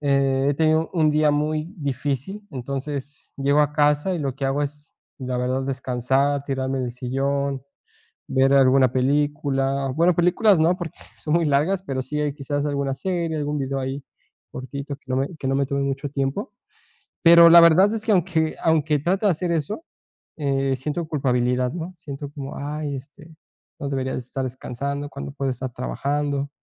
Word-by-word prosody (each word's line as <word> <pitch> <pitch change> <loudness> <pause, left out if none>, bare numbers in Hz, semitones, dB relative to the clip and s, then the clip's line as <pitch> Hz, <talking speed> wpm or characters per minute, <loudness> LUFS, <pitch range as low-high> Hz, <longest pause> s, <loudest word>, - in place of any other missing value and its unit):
eh, 140 -1 +2
he 145 - 0
tenido 160 +1 +2
un 160 -3 +3
día 150 0 +3
muy 155 +3 -1
difícil, 140 - -3
entonces 140 +1 -6
llego 140 +2 +2
a 150 0 +2
casa 150 +4 +2
y 175 - -2
lo 140 -4 -2
que 135 - -4
hago 135 +2 0
es 150 +2 -6 0.3
la 130 -1 -3
verdad 130 +2 -1
descansar, 135 +1 0
tirarme 135 -1 -2
en 130 - -1
el 120 - -5
sillón, 135 +2 -2 0.7
ver 135 +1 +3
alguna 130 -2 +5
película, 135 0 0
bueno 170 +3 +4
películas 180 +3 +4
no, 170 +3 +3
porque 170 -4 -7 0.2
son 150 - -3
muy 170 0 +3
largas, 155 +7 +2
pero 135 -8 -3
sí 150 +3 -3
hay 150 -1 0
quizás 145 0 -3
alguna 140 -1 -1
serie, 170 +1 -2
algún 150 0 -2
vídeo 135 -1 -2
ahí 135 +1 -4 0.5
cortito 140 +2 -6
que - - -38
no 130 - -1
me 135 +6 -1
que 135 - -5
no 135 - +1
me 140 - +1
tome 140 0 -2
mucho 140 +1 -2
tiempo. 140 - -3 0.7
Pero, 170 0 +9
la 170 - +10
verdad 170 +5 +6
es 220 - -3
que 220 - +1
aunque 170 -4 +1
aunque 155 -2 +2
trate 190 +7 0
de 195 - +5
hacer 175 +2 -2
eso, 170 - -2 0.5
eh, 135 -2 0
siento 150 +5 -3
culpabilidad, 125 -4 0
¿no?, 175 +2 -5
siento 145 -3 -7
como 140 -2 -7
ay, 145 0 -4
este, 155 +4 -13 0.4
no 140 - -4
debería 130 -1 -2
estar 130 +2 -4
descansando 140 +3 -4
cuando 70 - -7
puedo 135 - -2
estar 130 +1 -5
trabajando. 140 +2 -2
140 Hz, 180 wpm, -23 LUFS, 135-155 Hz, 0.7 s, la